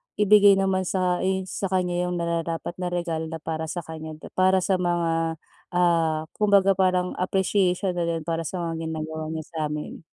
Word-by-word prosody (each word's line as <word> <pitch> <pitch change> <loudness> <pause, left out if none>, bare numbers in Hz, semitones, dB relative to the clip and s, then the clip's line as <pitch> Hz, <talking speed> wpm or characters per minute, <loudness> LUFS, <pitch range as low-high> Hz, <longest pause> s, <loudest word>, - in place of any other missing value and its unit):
ibigay 205 -1 +6
naman 190 -1 +1
sa 180 -1 +1
i 190 0 0
sa 190 +1 -3
kanya 180 -1 0
yung 180 - -2
nararapat 170 0 -2
na 180 - -1
regalo 170 -2 -2
na 165 0 -5
para 160 0 -3
sa 175 +1 -4
kanya 160 -1 -7
dib - - -12
para 185 0 +4
sa 195 - +2
mga, 165 -2 0 0.4
ah, 165 -3 +2
kumbaga 200 -2 +4
parang 185 -1 +1
appreciation 190 0 +1
na 175 - -2
rin 165 -1 -2
para 165 0 -1
sa 165 +3 -4
mga 165 -2 -3
ginagawa 160 0 -4
niya 160 -1 -4
sa 165 - -11
amin. 150 0 -6
175 Hz, 185 wpm, -25 LUFS, 165-185 Hz, 0.4 s, ibigay